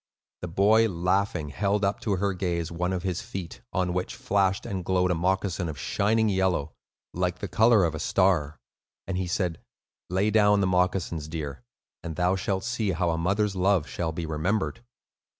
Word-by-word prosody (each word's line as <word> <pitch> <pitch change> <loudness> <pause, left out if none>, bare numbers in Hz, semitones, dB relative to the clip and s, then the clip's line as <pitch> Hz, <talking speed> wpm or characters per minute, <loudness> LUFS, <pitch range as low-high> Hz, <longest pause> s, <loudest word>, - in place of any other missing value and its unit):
The 90 - -4
boy, 105 +6 +4
laughing, 90 -2 0
held 100 +5 0
up 100 +1 0
to 105 - -1
her 100 +1 0
gaze 85 -3 -2
one 90 +2 -1
of 90 -2 -2
his 90 -3 -2
feet, 95 -7 -7
on 90 -2 0
which 90 0 -2
flashed 95 -1 +1
and 95 -2 -3
glowed 90 0 +1
a - - +3
moccasin 90 0 0
of 75 - -6
shining 110 +8 +1
yellow, 95 -7 0 0.4
like 90 0 -1
the 100 - -5
color 110 +3 +4
of 85 -2 +1
a 80 - -5
star, 85 -6 +1 0.5
and 95 - -3
he 90 0 -1
said, 85 -2 -1 0.5
"Lay 95 +4 +1
down 105 -1 +4
the 100 - +2
moccasins, 90 -4 0
dear, 80 - -5 0.4
and 80 -2 -6
thou 90 +2 +2
shalt 95 0 -2
see 115 -5 -1
how 85 0 0
a 80 - -1
mother's 100 +3 +1
love 95 -3 +2
shall 85 -2 -3
be 80 +1 -4
remembered." 95 +9 -1
95 Hz, 185 wpm, -27 LUFS, 85-100 Hz, 0.5 s, boy